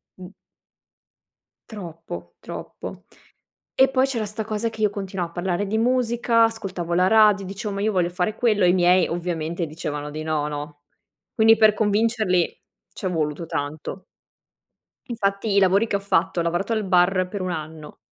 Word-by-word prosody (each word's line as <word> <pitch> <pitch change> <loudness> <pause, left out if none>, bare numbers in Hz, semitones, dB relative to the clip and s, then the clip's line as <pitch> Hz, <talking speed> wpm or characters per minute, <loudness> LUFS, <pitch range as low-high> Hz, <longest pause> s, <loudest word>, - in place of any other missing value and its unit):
m 185 -1 -10 1.4
Troppo, 165 - -8
troppo. - - -8 0.7
E 265 - +6
poi 260 0 +3
c'era 235 -5 -2
sta 210 +2 -4
cosa 215 +1 -2
che 220 -1 -8
io 210 - +4
continuavo 195 -3 -4
a - - -22
parlare 180 +2 -1
di 215 +3 -1
musica, 235 -1 +2
ascoltavo 185 -6 -3
la 180 +1 +4
radio, 210 -2 +5
dicevo 200 +2 -5
ma 200 - -3
io 215 +1 +1
voglio 180 -3 +1
fare 180 +4 -1
quello. 215 -5 +2
I 175 - +5
miei 180 0 +4
ovviamente 170 -1 -3
dicevano 150 -2 -5
di 155 +1 -6
no, 155 -2 -1
no? 145 0 -6 0.5
Quindi 225 0 +6
per 215 -1 +5
convincerli 215 -4 +1 0.3
c'è 190 - -5
voluto 160 -2 -2
tanto. 155 +4 -5 1.0
Infatti 200 -2 -1
i - - +6
lavori 195 +4 +3
che - - -1
ho 200 - +1
fatto 200 -2 0
ho - - -1
lavorato 175 +6 -1
al 215 - 0
bar 185 0 +3
per 200 0 -5
un 185 0 -2
anno, 155 -2 -7
190 Hz, 165 wpm, -23 LUFS, 170-215 Hz, 1.4 s, E